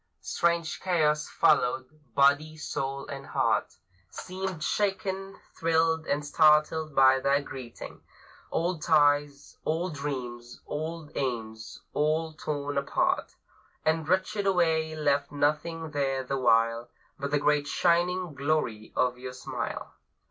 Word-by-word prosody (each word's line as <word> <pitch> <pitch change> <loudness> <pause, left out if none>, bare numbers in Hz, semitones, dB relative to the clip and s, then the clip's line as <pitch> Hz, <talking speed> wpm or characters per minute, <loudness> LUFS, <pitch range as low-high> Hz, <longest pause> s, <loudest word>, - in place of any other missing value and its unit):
Strange 170 -1 0
chaos 155 -5 +1
followed; 130 -5 +2 0.3
body, 155 +2 +3
soul, 135 -2 -3
and 140 -1 -7
heart - - 0 0.3
Seemed 185 - -5
shaken, 195 0 -1 0.2
thrilled, 160 -1 +1
and 145 +1 -1
startled 155 0 +3
by 130 0 +6
that 140 +1 +1
greeting. 125 -3 -9 0.5
Old 170 -1 -1
ties, 145 -2 +2
old 165 +2 -1
dreams, 125 -4 -5
old 155 0 -5
aims, 115 -4 -4
all 155 +2 0
torn 145 -2 -2
apart 140 - 0 0.5
And 160 0 +1
wrenched 190 +3 +1
away, 160 -4 +2
left 145 -2 +1
nothing 155 +2 -1
there 135 -2 0
the 135 +2 -2
while 115 0 +2 0.3
But 140 0 -2
the 145 - +2
great 145 0 +2
shining 175 +2 +1
glory 140 -7 -1
of 125 -1 +1
your 125 0 -6
smile. 130 - -5
150 Hz, 120 wpm, -28 LUFS, 140-165 Hz, 0.5 s, by